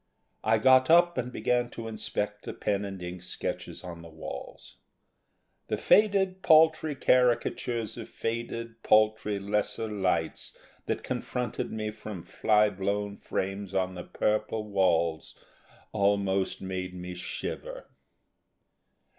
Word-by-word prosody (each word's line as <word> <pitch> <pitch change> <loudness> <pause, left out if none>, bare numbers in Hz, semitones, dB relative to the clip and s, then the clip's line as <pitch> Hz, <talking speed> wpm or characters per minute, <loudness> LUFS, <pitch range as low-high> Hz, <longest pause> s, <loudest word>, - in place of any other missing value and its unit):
I 110 +1 +4
got 130 +3 +5
up 175 +1 +6
and 125 0 -3
began 120 -1 0
to 115 -1 -5
inspect 105 -1 -3
the - - -5
pen 100 0 -1
and 95 -2 -6
ink 90 0 -6
sketches 90 - -5
on 85 -2 -8
the 85 - -11
walls. 80 0 -9 0.9
The - - -1
faded 195 -3 +3
paltry 160 -2 +5
caricatures 120 -3 +1
of 115 - -7
faded 115 0 -4
paltry 110 -1 +3
lesser 105 +2 -1
lights 95 -6 -1 0.3
that - - -2
confronted 125 -3 -3
me 110 -1 -3
from 105 -4 -8
fly 105 -1 +3
blown 100 +1 -2
frames 95 0 -4
on 95 -1 +1
the 90 -1 -6
purple 110 +3 -1
walls 85 -6 +1 0.6
almost 100 -2 +1
made 95 -1 -4
me 90 0 -6
shiver. - - -5
105 Hz, 120 wpm, -28 LUFS, 95-120 Hz, 0.9 s, up